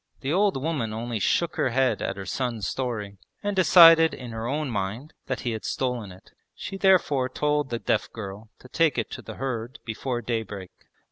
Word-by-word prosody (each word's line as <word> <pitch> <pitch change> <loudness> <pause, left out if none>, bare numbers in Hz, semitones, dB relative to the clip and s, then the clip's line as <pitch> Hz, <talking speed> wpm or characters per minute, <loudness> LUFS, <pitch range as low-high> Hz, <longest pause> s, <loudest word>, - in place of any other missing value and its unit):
The 140 +3 -1
old 200 -3 +2
woman 135 -7 -2
only 115 0 -3
shook 170 - +1
her - - +2
head 130 +1 +1
at - - -3
her 95 - -6
son's 115 0 -2
story, 105 -7 -4 0.2
and 205 0 -1
decided 165 -4 +7
in 125 -2 -8
her 115 0 -4
own 145 +1 -2
mind 110 +8 -4
that 130 - -2
he 120 - -2
had 110 -1 -5
stolen 125 -6 -2
it. 90 - -16 0.2
She - - -6
therefore 180 -9 +3
told 150 -1 0
the 120 - -2
deaf - - -1
girl 105 0 -8
to - - -13
take 155 +1 +2
it 115 - -2
to - - -6
the - - -9
herd 125 -2 -4
before 120 +2 -3
daybreak. 105 -5 -4
125 Hz, 195 wpm, -26 LUFS, 110-150 Hz, 0.2 s, decided